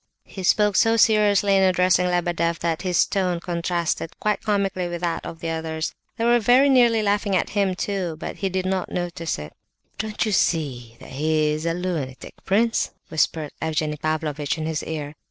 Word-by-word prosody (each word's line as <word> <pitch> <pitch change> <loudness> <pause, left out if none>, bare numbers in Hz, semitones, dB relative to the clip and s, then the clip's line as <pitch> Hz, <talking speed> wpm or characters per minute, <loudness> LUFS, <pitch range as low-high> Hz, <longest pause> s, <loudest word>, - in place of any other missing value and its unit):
He 190 - -9
spoke 205 +2 +3
so 225 0 +4
seriously 205 -2 +4
in 195 - +4
addressing 180 -1 +3
Lebedeff, 175 -1 0
that 165 -1 -2
his 180 -2 +2
tone 180 -3 -1
contrasted 170 -1 -2
quite 210 -1 0
comically 195 -4 0
with 175 0 -5
that 170 -2 -2
of 165 - -8
the 165 - -3
others. 160 0 -3 0.2
They 230 - 0
were 240 0 +4
very 250 +5 +5
nearly 240 -4 +4
laughing 205 -1 +1
at 180 - 0
him, 200 -3 +1
too, 185 -4 -2
but - - -6
he 195 - -1
did 185 0 -2
not 185 -1 -1
notice 170 -2 -3
it. 75 0 -8 0.5
"Don't 215 +1 -2
you 215 - -1
see 130 - 0
he 155 +2 0
is 155 +2 -2
a 165 - 0
lunatic, 165 -8 -4
prince?" 225 +4 +2 0.2
whispered 155 -1 0
Evgenie 155 -1 -1
Pavlovitch 155 -1 -2
in 155 - -3
his 160 -1 -2
ear. 150 -2 -5
175 Hz, 180 wpm, -23 LUFS, 160-200 Hz, 0.5 s, very